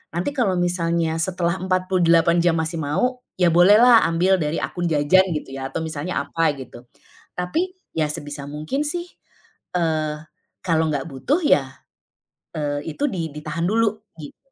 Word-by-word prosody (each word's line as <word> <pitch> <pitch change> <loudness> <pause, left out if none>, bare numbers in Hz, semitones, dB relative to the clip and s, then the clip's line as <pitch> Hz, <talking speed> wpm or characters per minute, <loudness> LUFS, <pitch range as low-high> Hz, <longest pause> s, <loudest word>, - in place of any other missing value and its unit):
nanti 175 +11 -1
kalau 240 -10 0
misalnya 170 -2 0
setelah 180 0 -1
48 180 -2 +2
jam 170 -1 +3
masih 160 +1 -2
mau, 190 - -1 0.2
ya 180 -2 +3
bolehlah 210 +8 +6
ambil 180 +3 +2
dari 150 0 -1
akun 175 -1 -2
jajan 160 +5 +3
gitu 135 - -9
ya 135 - -4
atau 135 +4 -4
misalnya 155 +1 -3
apa 155 +1 0
gitu. 125 -2 -11 0.5
Tapi 335 - -2 0.2
ya 155 -2 0
sebisa 145 -1 -6
mungkin 155 - -3
sih, 345 +3 -3 0.7
eee 155 -2 -1 0.5
kalau 160 -2 +2
nggak 140 -2 -2
butuh 165 - -1
ya, 135 - +2 0.8
eee 145 -1 -3
itu - - -4
di 165 -3 -3
ditahan 155 +3 -3
dulu 220 +1 +2 0.2
gitu, 150 -3 -11
170 Hz, 150 wpm, -22 LUFS, 150-185 Hz, 0.8 s, bolehlah